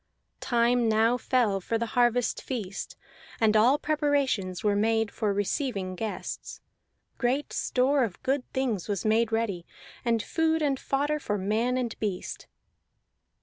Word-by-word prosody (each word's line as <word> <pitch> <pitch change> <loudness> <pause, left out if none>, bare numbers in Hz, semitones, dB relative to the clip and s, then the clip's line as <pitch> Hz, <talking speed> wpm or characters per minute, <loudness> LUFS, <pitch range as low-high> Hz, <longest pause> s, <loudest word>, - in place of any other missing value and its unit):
Time 240 -1 +2
now 220 +2 +3
fell 240 -6 +1
for 225 +5 -1
the 235 - -1
harvest 245 -1 +2
feast, 205 -7 -5 0.4
and 220 -1 +3
all 240 +7 +5
preparations 285 - 0
were 205 -1 +2
made 225 +1 +1
for 210 -2 -1
receiving 200 -1 -1
guests; 215 +3 -5 0.6
great 265 +4 0
store 265 +2 +2
of 205 -7 -4
good 270 0 +1
things 245 -9 -1
was 205 -2 -2
made 225 +1 +2
ready, 220 -6 -1 0.4
and 230 -2 +1
food 320 -1 +1
and 275 -2 +1
fodder 290 +2 0
for 210 -7 -2
man 220 +6 0
and 240 -3 -3
beast. 200 -4 -4
230 Hz, 140 wpm, -27 LUFS, 210-260 Hz, 0.6 s, all